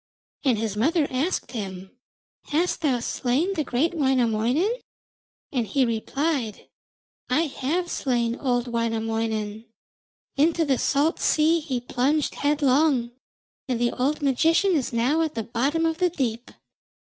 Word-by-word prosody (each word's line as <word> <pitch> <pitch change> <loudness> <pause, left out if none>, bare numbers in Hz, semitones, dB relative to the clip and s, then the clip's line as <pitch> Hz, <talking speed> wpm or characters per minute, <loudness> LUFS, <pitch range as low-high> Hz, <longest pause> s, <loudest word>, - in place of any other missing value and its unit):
And 255 -6 +3
his 215 -2 -2
mother 305 +8 +2
asked 275 +8 -1
him, 190 -5 -6 0.5
'Hast 335 +5 0
thou 265 -6 +1
slain 270 +11 0
great 310 0 0
Wainamoinen?' 265 - +1 0.7
and 245 -5 -1
he 270 +1 +2
replied, 240 +1 -2 0.6
'I 255 +5 +3
have 330 +3 -2
slain 240 -3 0
old 245 -2 0
Wainamoinen. 225 -2 -2 0.7
Into 325 +3 +3
the 270 -4 +1
salt 295 +4 +1
sea 320 +2 +3
he 280 -6 -3
plunged 265 +5 0
headlong, 285 -3 +2 0.6
and 250 -3 -1
the 240 0 +2
old 285 +4 -1
magician 325 +8 +3
is 295 -8 0
now 250 +7 +1
at 315 -2 -1
the 225 - -2
bottom 275 +9 0
of 325 +1 -1
the 360 -1 +3
deep.' 245 -7 -3
265 Hz, 130 wpm, -25 LUFS, 235-315 Hz, 0.7 s, And